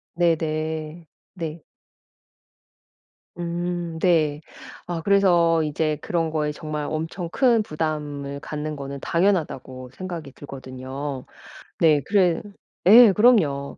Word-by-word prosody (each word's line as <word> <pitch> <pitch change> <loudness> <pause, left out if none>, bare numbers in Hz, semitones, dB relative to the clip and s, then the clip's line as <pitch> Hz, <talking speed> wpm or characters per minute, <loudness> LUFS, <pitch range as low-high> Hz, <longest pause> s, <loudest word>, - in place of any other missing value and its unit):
네네. 160 -1 -1 0.3
네. 165 -3 -6 1.8
음 175 -1 -3
네. 155 -5 +2 0.5
아 170 -2 -3
그래서 175 -4 +4
이제 155 0 -1
그런 165 -2 -1
거에 150 -1 -1
정말 150 0 -5
엄청 165 +2 -4
큰 240 +1 +3
부담을 150 -4 -4
갖는 150 0 -5
거는 140 -1 -6
당연하다고 150 -9 -1
생각이 170 -7 -6
들거든요. 130 0 -7 0.5
네. 155 -3 +4
그래 185 -5 +2 0.5
예. 225 0 +9
그럼요. 180 - +3
160 Hz, 200 characters per minute, -23 LUFS, 150-175 Hz, 1.8 s, 예